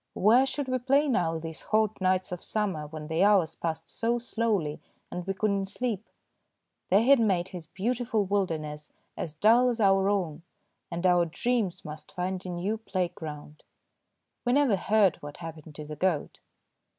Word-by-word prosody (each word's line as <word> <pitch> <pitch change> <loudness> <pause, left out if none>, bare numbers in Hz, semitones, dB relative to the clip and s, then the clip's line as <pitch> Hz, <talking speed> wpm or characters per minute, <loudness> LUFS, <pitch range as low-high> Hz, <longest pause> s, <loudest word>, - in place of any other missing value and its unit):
Where 240 +7 +5
should 270 +1 -3
we 255 0 0
play 275 +4 +3
now 175 - +1
these 160 0 -7
hot 215 -2 0
nights 185 0 +1
of 180 - -5
summer 190 -9 -2
when 155 0 -7
the 160 +3 +1
hours 195 -6 +4
passed 165 -1 -4
so 235 +1 0
slowly 220 -10 -1 0.3
and 180 +1 -5
we 195 - -1
could 215 +1 +1
not 195 -1 -1
sleep? 220 0 -2 0.9
They 200 +4 +5
had 275 +2 +6
made 190 -5 +1
his 175 -4 -8
beautiful 225 +3 -1
wilderness 160 -7 -2 0.2
as 155 -2 -5
dull 230 +8 +5
as 240 -1 -2
our 195 -1 +4
own, 175 -6 -1 0.5
and 170 +2 -3
our 175 -1 +5
dreams 210 +2 -1
must 150 0 -9
find 185 +1 -2
a 185 - -6
new 185 +5 -2
playground. 160 -7 -5 0.8
We 245 - +1
never 275 -6 +4
heard 195 -1 +3
what 145 0 -9
happened 160 -2 -9
to 150 - -7
the 150 0 -7
goat. 175 -3 -1
190 Hz, 170 wpm, -28 LUFS, 165-220 Hz, 0.9 s, had